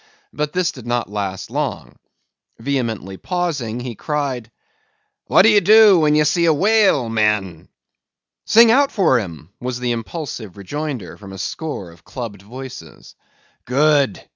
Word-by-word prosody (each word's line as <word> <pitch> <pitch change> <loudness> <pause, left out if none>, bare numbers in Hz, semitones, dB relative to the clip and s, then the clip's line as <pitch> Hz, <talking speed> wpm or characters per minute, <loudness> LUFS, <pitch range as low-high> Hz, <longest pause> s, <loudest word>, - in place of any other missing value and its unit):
But 150 0 -2
this 180 -1 +1
did 125 -3 -12
not 120 -3 -2
last 100 -2 -4
long. - - -4 0.6
Vehemently 115 -7 -3
pausing, 155 - -3
he 125 -1 -5
cried:— 135 -3 -3 0.8
"What - - +5
do 220 - +6
ye 210 -2 +6
do 210 -1 +6
when 150 -1 +3
ye 150 - +4
see 170 +3 +2
a 165 - +4
whale, 200 - +3
men?" 105 -6 -1 0.8
"Sing 230 +1 +7
out 280 +3 +3
for 170 - +3
him!" 85 -5 -8
was 125 0 -4
the 125 -1 -1
impulsive 115 - -6
rejoinder 125 - -5
from 100 -2 -12
a - - -8
score 100 - -5
of 85 - -20
clubbed 115 -6 -7
voices. 130 +5 -11 0.5
"Good!" 140 -2 +2
130 Hz, 145 wpm, -19 LUFS, 105-160 Hz, 0.8 s, Sing